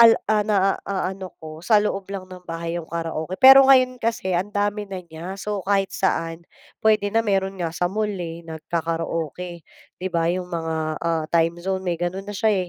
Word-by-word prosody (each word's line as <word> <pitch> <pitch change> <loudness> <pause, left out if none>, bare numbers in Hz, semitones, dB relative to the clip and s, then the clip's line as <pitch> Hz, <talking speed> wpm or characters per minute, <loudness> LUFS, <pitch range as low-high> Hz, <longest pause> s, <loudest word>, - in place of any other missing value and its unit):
al 230 -1 +9 0.3
na-aano 190 -2 -1
ko 155 0 -9
sa 215 +5 +4
loob 200 -2 0
lang 195 -1 -5
ng 180 -1 -11
bahay 165 0 -4
yung 170 -2 -6
karaoke. 165 +1 -3
Pero 270 +1 +10
ngayon 255 -1 +5
kasi 225 -5 -1
ang 180 +3 0
dami 205 +1 0
na 190 -1 -5
niya 170 +4 -7
so 205 0 -3
kahit 195 -1 +2
saan 165 -3 -1 0.4
pwede 215 -2 +3
na 225 - +4
meron 195 -3 0
nga 165 -2 -2
sa 175 - +1
mall, 215 +1 0
eh, 170 -4 -5
nag-kakaroke, 165 +1 -3 0.4
di 185 - -2
ba 170 -2 0
yung 180 0 -3
mga, 165 -2 -3 0.3
ah, 165 -2 0
Time 165 0 +1
Zone 190 +1 -2
may 175 -1 0
ganun 185 +3 -2
na 205 - -6
siya, 190 -3 +1
185 Hz, 185 wpm, -23 LUFS, 170-205 Hz, 0.4 s, Pero